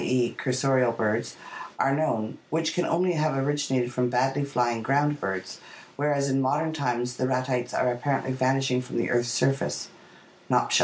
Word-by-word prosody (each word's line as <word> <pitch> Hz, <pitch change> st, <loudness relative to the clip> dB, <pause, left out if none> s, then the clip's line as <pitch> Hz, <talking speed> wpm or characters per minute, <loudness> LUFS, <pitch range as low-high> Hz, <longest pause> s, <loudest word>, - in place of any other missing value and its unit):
e., 125 Hz, -2 st, +1 dB
cursorial 130 Hz, -2 st, +2 dB
birds) 110 Hz, +1 st, -1 dB, 0.4 s
are 135 Hz, -, +3 dB
known, 115 Hz, -8 st, -1 dB
which 160 Hz, +1 st, 0 dB
can 175 Hz, -, 0 dB
only 180 Hz, +2 st, +2 dB
have 155 Hz, -3 st, 0 dB
originated 135 Hz, -3 st, 0 dB
from 125 Hz, 0 st, +1 dB
badly 135 Hz, +3 st, +1 dB
flying 120 Hz, -4 st, 0 dB
ground 145 Hz, +4 st, +1 dB
birds, 95 Hz, -3 st, -4 dB, 0.4 s
whereas 145 Hz, -1 st, +1 dB
in 135 Hz, 0 st, +2 dB
more 130 Hz, +1 st, +2 dB
modern 160 Hz, +2 st, 0 dB
times 125 Hz, -4 st, -2 dB
the 130 Hz, -, 0 dB
Ratites 130 Hz, -1 st, -1 dB
are 125 Hz, -, +2 dB
apparently 135 Hz, +1 st, -1 dB
vanishing 130 Hz, 0 st, +1 dB
from 125 Hz, -, -6 dB
the 115 Hz, -, 0 dB
earth's 120 Hz, 0 st, +1 dB
surface 135 Hz, +3 st, 0 dB, 0.6 s
(Nopcsa). -, -, +3 dB
130 Hz, 165 wpm, -26 LUFS, 125-145 Hz, 0.6 s, are